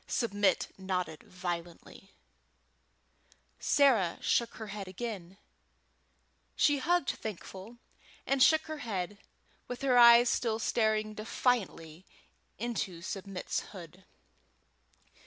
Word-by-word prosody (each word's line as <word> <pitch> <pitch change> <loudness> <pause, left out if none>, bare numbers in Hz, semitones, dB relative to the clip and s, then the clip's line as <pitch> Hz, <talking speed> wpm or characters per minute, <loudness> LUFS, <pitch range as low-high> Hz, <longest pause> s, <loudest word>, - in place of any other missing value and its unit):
Submit 205 -5 +1
nodded 185 -4 -3
violently. 175 +1 -7 1.5
Sarah 235 -12 +3
shook 235 -1 0
her 220 -2 -8
head 200 -2 -6
again. 190 -2 -6 1.2
She 290 -1 +3
hugged 345 +1 +1
Thankful, 210 +2 -8 0.5
and 275 -1 +1
shook 315 +4 +6
her 310 -1 -7
head, 200 -5 -4 0.5
with 245 +2 -6
her 255 -3 +4
eyes 235 0 +8
still 230 -2 0
staring 215 -1 0
defiantly 210 -7 -2 0.5
into 200 -7 -4
Submit's 195 -1 -4
hood. 180 -1 -11
215 Hz, 95 wpm, -31 LUFS, 185-240 Hz, 1.5 s, eyes